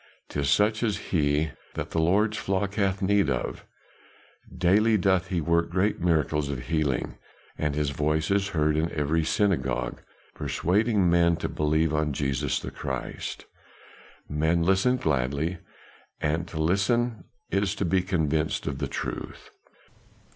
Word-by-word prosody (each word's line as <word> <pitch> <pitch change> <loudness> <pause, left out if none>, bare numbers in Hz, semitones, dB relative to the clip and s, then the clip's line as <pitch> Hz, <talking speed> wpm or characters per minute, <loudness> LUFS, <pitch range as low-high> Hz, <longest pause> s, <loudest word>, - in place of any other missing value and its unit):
"'Tis 70 -2 -1
such 105 +8 +3
as 110 -4 0
he 75 -2 0 0.2
that - - -4
the 80 - +1
Lord's 105 +6 +2
flock 100 0 -1
hath 100 -1 0
need 100 -4 +3
of; 60 -3 -3 0.8
daily 105 +5 +3
doth 95 -1 +2
he 90 -3 -1
work 85 +1 +1
great 95 +5 +1
miracles 75 -4 +1
of 60 -4 -5
healing, 75 -4 -1 0.4
and 75 -2 -1
his 75 -2 0
voice 75 +3 0
is 100 0 +2
heard 75 -4 +1
in 80 +2 0
every 75 +2 +1
synagogue 80 - 0 0.3
persuading 100 +1 +1
men 85 0 +4
to - - -3
believe 80 +1 +1
on 75 -1 0
Jesus 70 0 -1
the - - -7
Christ. - - -5 0.8
Men 80 +3 +1
listen 95 +8 +3
gladly; 75 - -1 0.6
and 80 +3 -1
to 80 - -6
listen 100 +5 +1 0.3
is 100 +1 +1
to 100 - -1
be 90 +2 +2
convinced 80 -4 0
of 70 -1 -3
the 70 - -1
truth." - - -6
85 Hz, 140 wpm, -26 LUFS, 75-95 Hz, 0.8 s, men